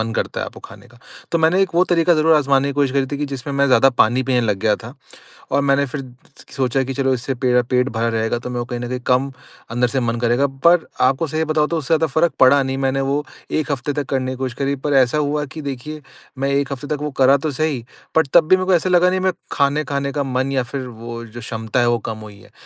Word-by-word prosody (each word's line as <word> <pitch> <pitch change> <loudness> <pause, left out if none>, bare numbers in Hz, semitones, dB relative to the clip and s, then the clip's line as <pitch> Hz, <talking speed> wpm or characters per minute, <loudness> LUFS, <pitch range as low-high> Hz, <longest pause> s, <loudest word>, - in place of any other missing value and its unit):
मन 115 0 -2
करता - - -2
है - - -3
आपको - - -11
खाने - - -13
का। 120 0 -20 0.3
तो 170 - +2
मैंने 165 +4 +3
एक 190 - 0
वो 180 - +4
तरीका 175 -1 +3
ज़रूर 160 +1 +4
आज़माने 140 -1 +2
की - - -2
कोशिश 140 -1 +1
करी 135 -1 +1
थी - - -1
कि 145 - -1
जिसमें 135 +1 -5
मैं 140 0 +3
ज़्यादा 130 0 +5
पानी 120 +1 +2
पीने 130 -1 +1
लग 105 -4 0
गया 105 +1 +2
था। 120 +4 -9 0.6
और 140 +1 +2
मैंने 140 0 +2
फिर 135 +1 -6 0.5
सोचा 135 0 +1
कि 135 +1 -4
चलो 135 0 +1
इससे 130 +1 -3
पे 125 0 +2
पेट 125 +2 0
भरा 115 -1 -1
रहेगा 115 +1 -1
तो 125 - -7
मेरे 125 - -3
को 120 - -3
कहीं 120 0 -5
न 120 - -4
कहीं 125 0 -3
कम 130 +2 +2 0.4
अंदर 120 +1 +1
से 130 +3 -1
मन 120 -1 -1
करेगा। 120 +4 +2 0.2
पर 175 -1 +5 0.2
आपको 135 +5 +2
सही 155 +2 -1
बताऊँ 155 -1 +1
तो 170 - -1
उससे 155 -2 -5
ज़्यादा 160 +1 +2
फ़र्क 160 0 +2
पड़ा 135 +2 +6
नहीं। 135 0 -3
मैंने 135 +1 0
वो 145 +1 0 0.3
1 155 -1 -1
हफ़्ते 140 +1 -2
तक 145 -1 -2
करने 130 -1 -1
की 130 - -6
कोशिश 130 -2 -3
करी 140 0 0
पर 145 - +1
ऐसा 125 +5 -1
हुआ 150 0 0
कि 155 - -5
देखिए 145 +2 -6 0.4
मैं 135 +1 0
1 140 0 0
हफ़्ते 140 +2 -8
तक 145 - -9
वो 150 -1 -3
करा 135 +2 +6
तो - - -1
सही 145 -7 0 0.3
बट 160 - +4
तब 170 -3 +6
भी 185 - +6
मेरे 185 - -2
को 185 - +2
ऐसा 175 +2 +2
लगा 180 0 +4
नहीं 185 +1 0
मैं 185 0 +1 0.2
खाना 145 +2 +1
खाने 140 -1 -1
का 145 -1 -1
मन 130 0 -1
या 130 -2 +1
फिर 130 +1 -5
वो 115 0 -8
जो 115 +1 -10
क्षमता 115 0 -3
है 120 - +3
वो 120 - +2
कम 110 - -5
हुई 100 -1 -14
है। - - -19
135 Hz, 275 wpm, -19 LUFS, 125-150 Hz, 0.6 s, पड़ा